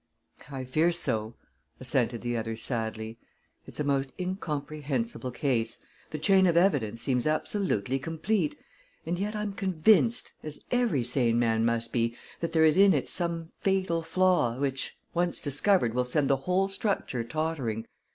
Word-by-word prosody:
"I 135 Hz, -2 st, -5 dB
fear 155 Hz, +7 st, +2 dB
so," 110 Hz, -9 st, -1 dB, 0.4 s
assented 120 Hz, -3 st, 0 dB
the 120 Hz, 0 st, -1 dB
other 115 Hz, 0 st, -2 dB
sadly. 110 Hz, -1 st, -3 dB, 0.5 s
"It's -, -, -11 dB
a -, -, +1 dB
most 135 Hz, -2 st, 0 dB
incomprehensible 145 Hz, -, -3 dB
case. 120 Hz, -3 st, -1 dB, 0.3 s
The 155 Hz, -, -4 dB
chain 190 Hz, +4 st, +4 dB
of 170 Hz, -1 st, +3 dB
evidence 135 Hz, -, +2 dB
seems 125 Hz, -1 st, +1 dB
absolutely 155 Hz, -, 0 dB
complete, 190 Hz, -, -1 dB, 0.5 s
and 175 Hz, +2 st, -2 dB
yet 210 Hz, +2 st, -2 dB
I'm 210 Hz, -1 st, -3 dB
convinced 200 Hz, +6 st, +2 dB
as 155 Hz, -1 st, -7 dB
every 240 Hz, -, +2 dB
sane 120 Hz, -1 st, +1 dB
man 115 Hz, -1 st, +2 dB
must 115 Hz, 0 st, -1 dB
be 115 Hz, -1 st, 0 dB, 0.2 s
that 170 Hz, -, -2 dB
there 160 Hz, -1 st, +4 dB
is 155 Hz, +1 st, +4 dB
in 195 Hz, 0 st, +6 dB
it -, -, -1 dB
some 170 Hz, -2 st, -1 dB
fatal 190 Hz, -4 st, +1 dB
flaw, 165 Hz, -7 st, +2 dB
which, 135 Hz, -1 st, -2 dB, 0.2 s
once 175 Hz, 0 st, +1 dB
discovered, 145 Hz, -, +2 dB
will 125 Hz, +1 st, +1 dB
send 140 Hz, +2 st, +1 dB
the 135 Hz, -, +3 dB
whole 190 Hz, +2 st, +2 dB
structure 195 Hz, -, -2 dB
tottering. 135 Hz, -6 st, -2 dB
150 Hz, 150 wpm, -28 LUFS, 120-180 Hz, 0.5 s, in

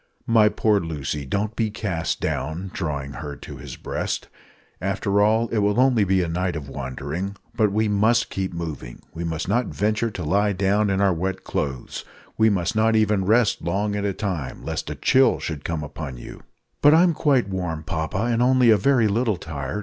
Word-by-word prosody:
"My 110 Hz, -2 st, +5 dB
poor 105 Hz, -1 st, +2 dB
Lucy, 75 Hz, -4 st, -4 dB
don't 105 Hz, -, -2 dB
be 110 Hz, -2 st, 0 dB
cast 100 Hz, -6 st, -2 dB
down," 85 Hz, +6 st, -3 dB
(drawing 70 Hz, -6 st, -3 dB
her 75 Hz, -1 st, -6 dB
to -, -, -10 dB
his -, -, -8 dB
breast), -, -, -4 dB, 0.5 s
"after 100 Hz, +2 st, 0 dB
all, 110 Hz, +3 st, +3 dB
it 115 Hz, -, 0 dB
will 105 Hz, +2 st, +2 dB
only 125 Hz, -4 st, +4 dB
be 95 Hz, -1 st, +2 dB
a -, -, -2 dB
night 90 Hz, +2 st, -1 dB
of 75 Hz, -3 st, -5 dB
wandering. 70 Hz, +9 st, -5 dB, 0.2 s
But 105 Hz, -2 st, +2 dB
we 110 Hz, +2 st, +1 dB
must 110 Hz, +3 st, +2 dB
keep 95 Hz, -1 st, -2 dB
moving. 80 Hz, -8 st, -6 dB
We 85 Hz, -, -5 dB
must 80 Hz, -2 st, -3 dB
not 125 Hz, 0 st, +1 dB
venture 110 Hz, +2 st, 0 dB
to 95 Hz, -5 st, -6 dB
lie 100 Hz, +6 st, +2 dB
down 100 Hz, +2 st, +1 dB
in 95 Hz, 0 st, +1 dB
our 100 Hz, -2 st, +4 dB
wet 95 Hz, +3 st, -3 dB
clothes. 65 Hz, -4 st, -4 dB, 0.3 s
We 110 Hz, 0 st, +4 dB
must 95 Hz, +1 st, 0 dB
not 110 Hz, +1 st, +3 dB
even 105 Hz, -3 st, +2 dB
rest 110 Hz, +2 st, +3 dB
long 100 Hz, +5 st, -1 dB
at 100 Hz, -, -2 dB
a 100 Hz, -, +1 dB
time, 90 Hz, -, -4 dB
lest -, -, -4 dB
a -, -, -4 dB
chill 130 Hz, 0 st, +4 dB
should 75 Hz, -3 st, -5 dB
come 80 Hz, -2 st, -3 dB
upon 75 Hz, -3 st, -7 dB
you." -, -, -10 dB, 0.4 s
"But 145 Hz, +2 st, +7 dB
I'm 170 Hz, +1 st, +5 dB
quite 140 Hz, -8 st, +2 dB
warm, 90 Hz, -5 st, -3 dB
papa, 80 Hz, +5 st, -2 dB
and 115 Hz, 0 st, +1 dB
only 125 Hz, -1 st, +5 dB
a 110 Hz, -, +6 dB
very 120 Hz, +1 st, +3 dB
little 110 Hz, -1 st, +1 dB
tired. 70 Hz, +4 st, -5 dB
100 Hz, 195 wpm, -23 LUFS, 80-110 Hz, 0.5 s, But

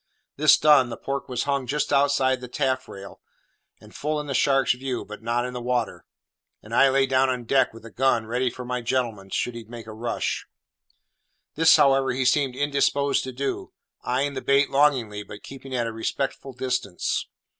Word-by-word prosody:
This 150 Hz, +1 st, +6 dB
done, 145 Hz, -5 st, +5 dB
the -, -, -6 dB
pork 140 Hz, 0 st, -4 dB
was 125 Hz, -1 st, -1 dB
hung 140 Hz, -2 st, -1 dB
just 150 Hz, +1 st, -1 dB
outside 140 Hz, -2 st, +2 dB
the 125 Hz, -, -7 dB
taffrail, 130 Hz, -7 st, -3 dB, 0.6 s
and -, -, -17 dB
full 150 Hz, +1 st, -2 dB
in 150 Hz, -, -5 dB
the 140 Hz, -, -4 dB
shark's 135 Hz, -1 st, +3 dB
view, 130 Hz, 0 st, -4 dB
but 105 Hz, +1 st, -10 dB
not 120 Hz, +2 st, -1 dB
in 125 Hz, -, -5 dB
the 125 Hz, -, -5 dB
water; 125 Hz, 0 st, -2 dB, 0.6 s
and -, -, -11 dB
I 135 Hz, -, +5 dB
lay 135 Hz, 0 st, +3 dB
down 130 Hz, 0 st, +2 dB
on 125 Hz, -1 st, -2 dB
deck 130 Hz, +3 st, +2 dB
with 115 Hz, 0 st, -14 dB
the 115 Hz, -, -11 dB
gun 125 Hz, -3 st, +1 dB
ready 125 Hz, +3 st, 0 dB
for 125 Hz, +1 st, -8 dB
my 125 Hz, 0 st, -3 dB
gentleman, 115 Hz, -5 st, -2 dB
should 125 Hz, -, -2 dB
he 115 Hz, -1 st, -8 dB
make 115 Hz, 0 st, -10 dB
a 110 Hz, -, -9 dB
rush. 115 Hz, +2 st, -3 dB, 1.1 s
This, 160 Hz, +1 st, +6 dB
however, 135 Hz, -3 st, +3 dB
he 130 Hz, +1 st, -1 dB
seemed 135 Hz, 0 st, +2 dB
indisposed 140 Hz, 0 st, +1 dB
to 130 Hz, -, -5 dB
do; 135 Hz, +2 st, -4 dB, 0.3 s
eyeing 135 Hz, +3 st, 0 dB
the 130 Hz, -, -4 dB
bait 140 Hz, +1 st, +2 dB
longingly, 130 Hz, -7 st, +2 dB
but 105 Hz, 0 st, -11 dB
keeping 135 Hz, -1 st, -8 dB
at 120 Hz, -1 st, 0 dB
a 115 Hz, -, -3 dB
respectful 135 Hz, +4 st, -3 dB
distance. 125 Hz, -7 st, -2 dB
130 Hz, 190 wpm, -24 LUFS, 120-140 Hz, 1.1 s, This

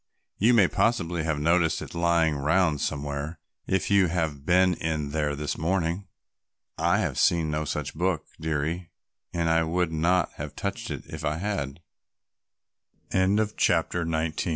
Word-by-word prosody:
You 120 Hz, +4 st, +5 dB
may 100 Hz, -5 st, +6 dB
possibly 90 Hz, -8 st, +1 dB
have 80 Hz, -2 st, 0 dB
noticed 80 Hz, +2 st, +2 dB
it -, -, -8 dB
lying 85 Hz, -2 st, +2 dB
round 75 Hz, +2 st, +2 dB
somewhere 70 Hz, +2 st, -3 dB, 0.3 s
if 95 Hz, +1 st, 0 dB
you 100 Hz, -2 st, +5 dB
have 80 Hz, -5 st, -2 dB
been 90 Hz, +1 st, +5 dB
in 80 Hz, -3 st, -2 dB
there 75 Hz, -1 st, 0 dB
this 75 Hz, +1 st, -3 dB
morning." 85 Hz, +2 st, -1 dB, 0.7 s
"I -, -, +2 dB
have -, -, -1 dB
seen 80 Hz, -3 st, +3 dB
no 75 Hz, 0 st, -1 dB
such 75 Hz, -1 st, -3 dB
book, 85 Hz, 0 st, -1 dB
dearie, 80 Hz, +3 st, -2 dB, 0.4 s
and 85 Hz, -1 st, -1 dB
I 80 Hz, 0 st, +3 dB
would 85 Hz, +1 st, 0 dB
not 85 Hz, +2 st, +2 dB
have -, -, -6 dB
touched -, -, -4 dB
it -, -, -5 dB
if -, -, -8 dB
I 80 Hz, 0 st, -1 dB
80 Hz, 135 wpm, -26 LUFS, 75-90 Hz, 0.7 s, may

